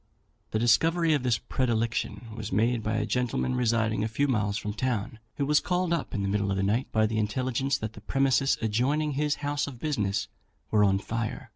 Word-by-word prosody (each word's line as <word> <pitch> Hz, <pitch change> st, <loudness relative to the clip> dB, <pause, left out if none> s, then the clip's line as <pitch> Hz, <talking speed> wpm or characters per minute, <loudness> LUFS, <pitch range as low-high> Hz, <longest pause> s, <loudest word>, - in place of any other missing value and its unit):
The -, -, -1 dB
discovery 160 Hz, +9 st, +3 dB
of 145 Hz, -, +1 dB
this 125 Hz, -4 st, +2 dB
predilection 115 Hz, -1 st, -2 dB
was 110 Hz, -2 st, -6 dB
made 115 Hz, +4 st, +2 dB
by 110 Hz, 0 st, -1 dB
a 105 Hz, -1 st, 0 dB
gentleman 125 Hz, +2 st, 0 dB
residing 115 Hz, -3 st, +1 dB
a -, -, +1 dB
few 140 Hz, +6 st, 0 dB
miles 105 Hz, -5 st, 0 dB
from 105 Hz, -2 st, -4 dB
town, 115 Hz, -2 st, -2 dB, 0.2 s
who 140 Hz, -, -1 dB
was 150 Hz, +1 st, +4 dB
called 180 Hz, -1 st, 0 dB
up 165 Hz, -, -2 dB
in 100 Hz, -, -1 dB
the -, -, 0 dB
middle 100 Hz, 0 st, 0 dB
of 95 Hz, -, 0 dB
the 95 Hz, -, 0 dB
night 110 Hz, +6 st, 0 dB
by 110 Hz, -1 st, +3 dB
the 110 Hz, 0 st, -1 dB
intelligence 130 Hz, +5 st, 0 dB
that 110 Hz, 0 st, -5 dB
the 105 Hz, -, -12 dB
premises 135 Hz, +3 st, +2 dB
adjoining 135 Hz, +8 st, +1 dB
his 145 Hz, +1 st, 0 dB
house 145 Hz, 0 st, 0 dB
of 130 Hz, -4 st, -8 dB
business 105 Hz, -10 st, -1 dB, 0.4 s
were 105 Hz, -1 st, +4 dB
on 95 Hz, -1 st, +4 dB
fire. 115 Hz, +2 st, -4 dB
115 Hz, 210 wpm, -28 LUFS, 105-135 Hz, 0.4 s, was